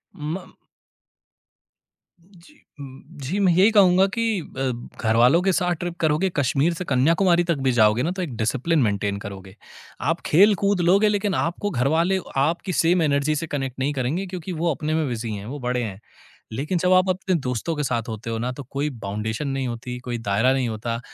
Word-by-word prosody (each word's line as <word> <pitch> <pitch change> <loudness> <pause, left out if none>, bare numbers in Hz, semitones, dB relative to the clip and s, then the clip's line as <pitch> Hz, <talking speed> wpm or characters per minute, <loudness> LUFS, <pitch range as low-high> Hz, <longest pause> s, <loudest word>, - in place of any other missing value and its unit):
म 165 +5 -6 1.7
जी 190 - -21 0.2
म 135 -1 -10 0.2
जी, 185 +10 -2
मैं 190 -3 +4
यही 195 +6 +5
कहूँगा 190 -2 +5
कि 225 -4 0
अ, 135 -3 -3 0.3
घरवालों 120 +9 +4
के 190 0 +2
साथ 180 0 +1
ट्रिप 175 -1 -4
करोगे, 160 +4 +1
कश्मीर 145 +4 +1
से 180 +1 -5
कन्याकुमारी 170 +6 +3
तक 170 -2 0
भी - - +4
जाओगे 110 +1 +3
ना 175 - 0
तो 185 0 -4
एक 140 -9 -4
डिसिप्लिन 135 +8 0
मेंटेन 100 -2 0
करोगे। 95 -1 -9 0.5
आप - - -1
खेलकूद 200 +2 +4
लोगे 205 +2 +4
लेकिन 205 -2 0
आपको 175 +5 -1
घरवाले 165 +9 +1 0.3
आपकी 175 +3 -3
सेम 170 +2 +3
एनर्जी 145 0 +1
से 165 +2 -3
कनेक्ट 135 -3 -4
नहीं 140 +2 0
करेंगे 140 +9 -2
क्योंकि 180 0 -6
वो 170 - +2
अपने 155 +2 -3
में 160 -2 0
बिज़ी 115 -2 -4
हैं, 100 0 -6
वो 140 +5 -6
बड़े 125 0 -1
हैं। 100 -2 -6 0.5
लेकिन 150 +9 -2
जब 180 +2 +1
आप 185 +1 +4
अपने 185 0 0
दोस्तों 125 +6 -2
के 150 - -2
साथ 120 -3 -2
होते 110 +1 -6
हो 115 - -2
ना 125 +2 -2
तो 140 - -8
कोई 145 +2 -1
बाउंडेशन 110 +7 -3
नहीं 135 -1 -2
होती, 125 +1 -5
कोई 125 -1 -4
दायरा 110 +3 +1
नहीं 130 -2 0
होता, 115 +2 -3
150 Hz, 190 wpm, -23 LUFS, 125-180 Hz, 1.7 s, यही